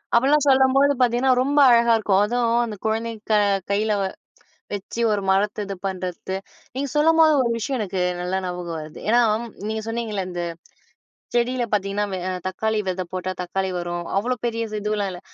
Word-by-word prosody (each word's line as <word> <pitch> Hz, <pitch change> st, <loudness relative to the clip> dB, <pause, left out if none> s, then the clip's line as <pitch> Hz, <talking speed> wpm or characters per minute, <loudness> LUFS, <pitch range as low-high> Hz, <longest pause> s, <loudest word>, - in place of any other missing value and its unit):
அப்படிலாம் 285 Hz, +4 st, +4 dB
சொல்லம்போது 270 Hz, +1 st, +4 dB
பாத்தீங்கன்னா, 245 Hz, +2 st, +3 dB
ரொம்ப 285 Hz, +3 st, +2 dB
அழகா 235 Hz, 0 st, +5 dB
இருக்கும். 200 Hz, -3 st, +2 dB
அதும் 235 Hz, +1 st, 0 dB
அந்த 215 Hz, -3 st, -6 dB
குழந்தைங்க 225 Hz, 0 st, -2 dB
க -, -, +5 dB, 0.3 s
கையில 210 Hz, +2 st, +1 dB, 0.8 s
வெச்சு 205 Hz, +3 st, -4 dB
ஒரு 205 Hz, -1 st, 0 dB
மரத்த 205 Hz, +2 st, +1 dB
இது 195 Hz, -, -4 dB
பண்றத்து. 185 Hz, 0 st, -4 dB, 0.4 s
நீங்க 275 Hz, +1 st, -2 dB
சொல்லம்போது 320 Hz, +1 st, +5 dB
ஒரு 235 Hz, -, 0 dB
விஷயம் 260 Hz, +3 st, -2 dB
எனக்கு 190 Hz, -2 st, -2 dB, 0.2 s
நல்லா 180 Hz, +1 st, -1 dB
ஞாபகம் 175 Hz, -2 st, -4 dB
வருது, 155 Hz, 0 st, -10 dB
ஏன்னா 240 Hz, +2 st, +5 dB, 0.5 s
நீங்க 220 Hz, 0 st, -2 dB
அம் 225 Hz, -, -9 dB
சொன்னீங்கள்ல 225 Hz, -4 st, -3 dB
இந்த 175 Hz, -1 st, -3 dB, 0.9 s
செடியில 245 Hz, +1 st, +1 dB
பாத்தீங்கன்னா 200 Hz, 0 st, 0 dB
வெ -, -, -1 dB, 0.3 s
தக்காளி 220 Hz, +4 st, -1 dB
வித 185 Hz, 0 st, -1 dB
போட்டா 185 Hz, 0 st, -3 dB
தக்காளி 190 Hz, +2 st, -2 dB
வரும், 175 Hz, 0 st, -3 dB
அவ்ளோ 240 Hz, +6 st, +1 dB
பெரிய 230 Hz, -1 st, -1 dB
இது 215 Hz, 0 st, -4 dB
இதுல்லாம் 210 Hz, -1 st, -1 dB
இல்ல. 180 Hz, -1 st, -8 dB
215 Hz, 165 wpm, -23 LUFS, 190-240 Hz, 0.9 s, அழகா